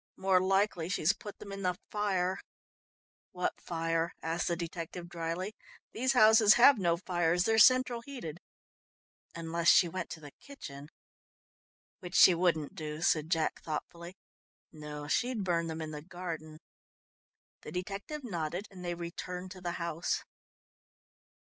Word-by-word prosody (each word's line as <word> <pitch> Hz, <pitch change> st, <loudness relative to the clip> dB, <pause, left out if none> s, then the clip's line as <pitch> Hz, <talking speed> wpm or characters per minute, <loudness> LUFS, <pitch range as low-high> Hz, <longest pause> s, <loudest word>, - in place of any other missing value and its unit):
"More 190 Hz, -1 st, +3 dB
likely 190 Hz, -3 st, +1 dB
she's 175 Hz, -2 st, +2 dB
put 210 Hz, -4 st, -10 dB
them 200 Hz, -, -10 dB
in 195 Hz, 0 st, -6 dB
the 180 Hz, -1 st, 0 dB
fire." 190 Hz, -3 st, 0 dB, 0.9 s
"What 180 Hz, 0 st, -2 dB
fire?" 165 Hz, 0 st, -1 dB
asked 165 Hz, +2 st, -1 dB
the 170 Hz, -, +1 dB
detective 170 Hz, +1 st, -6 dB
dryly. 170 Hz, +4 st, -4 dB, 0.4 s
"These 260 Hz, +3 st, +1 dB
houses 220 Hz, -3 st, +7 dB
have 245 Hz, 0 st, +7 dB
no 170 Hz, -3 st, +2 dB
fires, 175 Hz, -1 st, +1 dB
they're 225 Hz, +2 st, +3 dB
central 255 Hz, 0 st, +5 dB
heated 230 Hz, -, -7 dB, 1.0 s
unless 170 Hz, 0 st, 0 dB
she 175 Hz, -, +7 dB
went 185 Hz, +3 st, -5 dB
to 160 Hz, -, -7 dB
the 145 Hz, -2 st, -11 dB
kitchen." 145 Hz, -, -10 dB, 1.1 s
"Which 180 Hz, -3 st, -8 dB
she 185 Hz, -, +8 dB
wouldn't 165 Hz, -4 st, +1 dB
do," 155 Hz, 0 st, -5 dB
said 155 Hz, -2 st, +2 dB
Jack 165 Hz, -2 st, 0 dB
thoughtfully. 170 Hz, +3 st, -6 dB, 0.6 s
"No, 150 Hz, -1 st, -8 dB
she'd 240 Hz, +6 st, 0 dB
burn 170 Hz, -2 st, 0 dB
them 160 Hz, 0 st, -4 dB
in 155 Hz, -, -6 dB
the 150 Hz, -1 st, -6 dB
garden." 165 Hz, -2 st, -7 dB, 1.0 s
The -, -, -9 dB
detective 200 Hz, -, -5 dB
nodded, 175 Hz, -3 st, -3 dB
and 185 Hz, -2 st, -10 dB
they 175 Hz, -1 st, -2 dB
returned 180 Hz, +2 st, -6 dB
to 185 Hz, -1 st, -10 dB
the 175 Hz, -1 st, -3 dB
house. 170 Hz, -1 st, -2 dB
175 Hz, 140 wpm, -31 LUFS, 165-195 Hz, 1.1 s, she